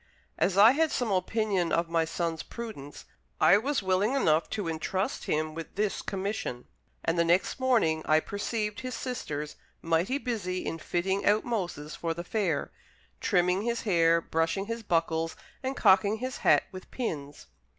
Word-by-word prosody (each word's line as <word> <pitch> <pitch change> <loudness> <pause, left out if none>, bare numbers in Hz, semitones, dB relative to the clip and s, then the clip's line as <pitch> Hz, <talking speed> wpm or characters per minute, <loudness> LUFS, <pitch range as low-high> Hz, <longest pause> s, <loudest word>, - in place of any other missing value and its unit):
As 195 - +1
I 215 +4 +9
had 315 +4 +2
some 240 -4 -1
opinion 190 -1 0
of 170 0 +1
my 165 -1 +1
son's 165 0 -2
prudence, 215 -12 -8 0.3
I 200 - +6
was 275 -1 -1
willing 190 +7 +2
enough 160 - +2
to 205 -5 -3
intrust 175 +5 -2
him 155 0 -1
with 165 0 -8
this 205 0 -1
commission; 195 - -4 0.4
and 165 +1 +1
the - - +5
next 175 +9 +1
morning 225 -12 +2
I 155 0 +5
perceived 210 +3 -3
his 255 -2 -5
sisters 150 - -4 0.2
mighty 165 +10 +1
busy 205 -9 -3
in 165 - -3
fitting 190 +4 -1
out 210 +1 +3
Moses 175 -10 -3
for 165 -1 -3
the 170 - -5
fair 180 -5 -1 0.5
trimming 180 +2 +2
his 235 +1 -1
hair, 170 -4 +4
brushing 165 +5 -1
his 230 +2 -4
buckles, 165 -4 0 0.3
and 265 0 -3
cocking 200 +3 +4
his 255 +2 -4
hat - - +4
with 185 -1 -10
pins. 145 - -5
185 Hz, 160 wpm, -29 LUFS, 165-220 Hz, 0.5 s, I